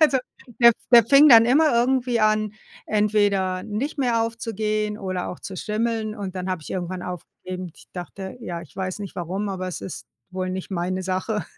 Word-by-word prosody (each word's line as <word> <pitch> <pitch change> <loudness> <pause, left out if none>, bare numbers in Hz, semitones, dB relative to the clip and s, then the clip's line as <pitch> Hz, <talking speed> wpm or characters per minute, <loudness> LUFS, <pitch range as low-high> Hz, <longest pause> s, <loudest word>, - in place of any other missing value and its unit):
Also 300 -4 +5 0.4
der 235 0 +9 0.2
der 235 -2 +9
fing 280 +6 +7
dann 230 -3 +9
immer 300 +5 +4
irgendwie 245 0 +2
an, 215 -1 +2 0.3
entweder 205 -3 +1
nicht 225 +9 -4
mehr 240 -4 +2
aufzugehen 215 -2 -2
oder 185 -3 -3
auch - - -7
zu 190 - -7
schimmeln, 220 +1 -2
und 195 -3 -6
dann 185 0 -4
habe 185 -3 -2
ich - - -10
irgendwann 180 0 -4
aufgegeben. 180 0 -7
Ich - - -18
dachte, 190 +2 -7
ja, 170 -6 -5
ich 170 - -14
weiß 190 +1 -3
nicht 200 -3 -7
warum, 185 +4 -3
aber 185 -1 -3
es 180 - -5
ist 190 - -7 0.2
wohl 185 0 -3
nicht 185 +1 -5
meine 185 +1 -2
Sache. 190 +3 -2
205 Hz, 185 wpm, -23 LUFS, 185-230 Hz, 0.4 s, der